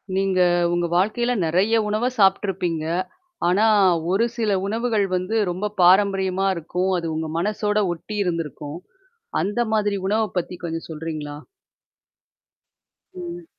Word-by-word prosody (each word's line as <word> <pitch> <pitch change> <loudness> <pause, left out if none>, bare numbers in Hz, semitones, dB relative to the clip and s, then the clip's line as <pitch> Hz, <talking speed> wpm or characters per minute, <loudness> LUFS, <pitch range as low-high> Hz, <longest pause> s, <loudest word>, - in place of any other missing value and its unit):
நீங்க 190 -1 +1 0.3
உங்க 175 0 +1
வாழ்க்கையில 220 +6 +1
நெறைய 185 +8 +2
உணவ 215 +4 0
சாப்புட்டுருப்பீங்க. 190 -5 +1 0.6
ஆனா 195 +5 +3 0.5
ஒரு 205 +5 +3
சில 215 -4 +1
உணவுகள் 220 -1 0
வந்து 185 +5 -1
ரொம்ப 200 +4 -3
பாரம்பரியமா 190 +1 +4
இருக்கும். 180 +3 -2
அது 165 -1 -4
உங்க 160 0 -3
மனசோட 210 +2 0
ஒட்டி 175 +6 -7
இருந்திருக்கும். 160 -2 -4 0.6
அந்த 220 +5 0
மாதிரி 205 -2 +1
உணவ 215 +3 +2
பத்தி 180 +1 -3
கொஞ்சம் 165 0 -4
சொல்றீங்களா? 155 -2 -5 1.8
ம். 350 -1 -7
195 Hz, 115 wpm, -22 LUFS, 175-215 Hz, 1.8 s, பாரம்பரியமா